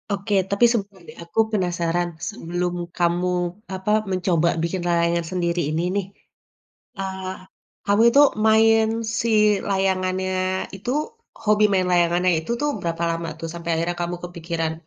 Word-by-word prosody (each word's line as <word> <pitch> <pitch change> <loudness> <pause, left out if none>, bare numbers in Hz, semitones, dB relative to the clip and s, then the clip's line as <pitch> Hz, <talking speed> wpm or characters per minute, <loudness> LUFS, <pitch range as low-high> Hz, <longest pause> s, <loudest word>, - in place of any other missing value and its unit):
Oke, 200 +1 -2 0.2
tapi 200 +4 +4
sebentar 200 -5 -3
deh. - - -12
Aku 170 +6 -4
penasaran, 175 -3 0 0.2
sebelum 175 -3 -3 0.2
kamu, 175 +1 +1 0.4
apa, 190 +3 -2 0.2
mencoba 175 -2 +1
bikin 175 +2 -2
layangan 170 0 +1
sendiri 175 -1 0
ini 160 +2 -1
nih, 200 -2 0 0.9
eee, 190 -1 -4 0.5
kamu 200 +2 +3
itu 285 - +7 0.2
main 220 0 +5 0.3
si 230 - 0 0.4
layangannya 190 -1 0 0.4
itu 205 +6 -4 0.5
hobi 210 0 +4
main 185 -2 +2
layangannya 175 +1 +3
itu 160 - -6
tuh 295 - +1
berapa 170 0 -2
lama 165 0 -3
tuh 165 - -4
sampai 170 0 -6
akhirnya 170 +1 -2
kamu 175 +1 -2
kepikiran, 170 -2 -3
180 Hz, 135 wpm, -23 LUFS, 170-195 Hz, 0.9 s, itu